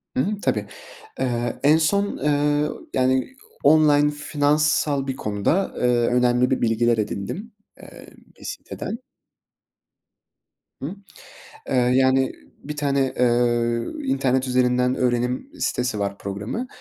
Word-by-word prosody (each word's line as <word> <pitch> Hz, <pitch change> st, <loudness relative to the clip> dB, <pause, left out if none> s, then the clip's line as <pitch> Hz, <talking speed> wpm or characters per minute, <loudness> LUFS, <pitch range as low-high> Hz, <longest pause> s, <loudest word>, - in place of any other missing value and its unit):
Hı 130 Hz, -, +2 dB
hı, 205 Hz, +1 st, -3 dB
tabii. 105 Hz, -2 st, 0 dB, 0.5 s
Eee, 120 Hz, -2 st, -1 dB
en 150 Hz, +3 st, +6 dB
son, 200 Hz, +6 st, +1 dB
eee, 145 Hz, +1 st, +1 dB, 0.2 s
yani, 130 Hz, -, +1 dB, 0.3 s
online 150 Hz, -2 st, +5 dB
finansal 145 Hz, -1 st, +1 dB
bir 130 Hz, -, -2 dB
konuda, 105 Hz, -, -1 dB
eee, -, -, -4 dB
önemli 125 Hz, +1 st, +2 dB
bir -, -, +1 dB
bilgiler 115 Hz, 0 st, +2 dB
edindim, 110 Hz, -, -4 dB, 0.3 s
eee, -, -, -13 dB, 0.3 s
bir -, -, -14 dB
siteden. 230 Hz, -, -6 dB, 1.8 s
Hıh? 160 Hz, +9 st, -5 dB, 0.7 s
Eee, -, -, -1 dB
yani, 130 Hz, +1 st, +3 dB, 0.3 s
bir 150 Hz, +1 st, -6 dB
tane, 140 Hz, -2 st, 0 dB
eee, 120 Hz, -1 st, +2 dB, 0.2 s
internet 130 Hz, -, +1 dB
üzerinden 125 Hz, 0 st, +2 dB
öğrenim 125 Hz, -, -1 dB
sitesi 125 Hz, -4 st, -1 dB
var, 100 Hz, 0 st, -3 dB
programı, 105 Hz, -, -4 dB
130 Hz, 115 wpm, -23 LUFS, 120-150 Hz, 1.8 s, en